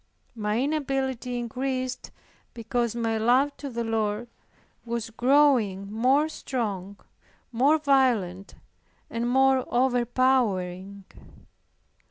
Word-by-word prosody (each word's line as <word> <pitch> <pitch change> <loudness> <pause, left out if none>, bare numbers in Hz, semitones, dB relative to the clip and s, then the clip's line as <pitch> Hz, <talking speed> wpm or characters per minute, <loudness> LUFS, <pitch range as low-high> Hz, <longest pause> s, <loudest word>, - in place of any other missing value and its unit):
My 210 -1 -1
inability 265 -3 -2
increased 255 +2 -3 0.5
because 235 0 -2
my 225 -1 -1
love 260 +6 +2
to 285 - -6
the 235 -2 -3
Lord 220 0 -2 0.5
was 235 -1 -4
growing 235 -6 +2
more 265 +7 +3
strong, 205 -10 -4 0.5
more 270 +7 +3
violent 245 - +1 0.6
and 235 +1 -2
more 265 0 +3
overpowering. 240 -7 0
240 Hz, 90 wpm, -26 LUFS, 220-265 Hz, 0.6 s, more